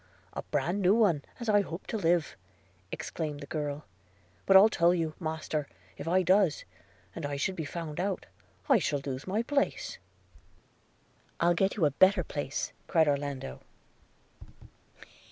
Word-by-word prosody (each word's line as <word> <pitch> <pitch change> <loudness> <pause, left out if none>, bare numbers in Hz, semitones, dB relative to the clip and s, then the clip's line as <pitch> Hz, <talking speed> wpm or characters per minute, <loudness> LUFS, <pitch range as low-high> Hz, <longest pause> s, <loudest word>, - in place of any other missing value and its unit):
'A - - -4
bran 165 +7 0
new 190 +2 +5
one, 200 -10 +3 0.2
as 235 - -6
I 205 -1 +5
hope 175 -2 -7
to - - -4
live!' 170 -6 +1 0.6
exclaimed 150 -3 -4
the 145 - -7
girl; 150 0 -4 0.6
'but 195 - +8
I'll 200 +3 +8
tell 175 -4 +3
you, 165 -3 -1
master, 155 -3 -3 0.3
if - - -8
I 185 +2 +3
does, 185 -3 +3 0.5
and 165 - -7
I 145 0 -2
should 185 +7 -1
be 160 - -4
found 160 0 -5
out, 190 +1 -2 0.4
I 270 -7 +5
shall 145 -5 -1
lose 135 +2 -5
my 210 +5 0
place.' 280 +3 -1 1.4
'I'll 170 +1 +4
get 195 +3 +1
you 170 - +3
a 145 - +3
better 185 +5 +4
place,' 145 -2 -4
cried 160 -3 +3
Orlando. 140 - -2
165 Hz, 155 wpm, -30 LUFS, 145-190 Hz, 1.4 s, but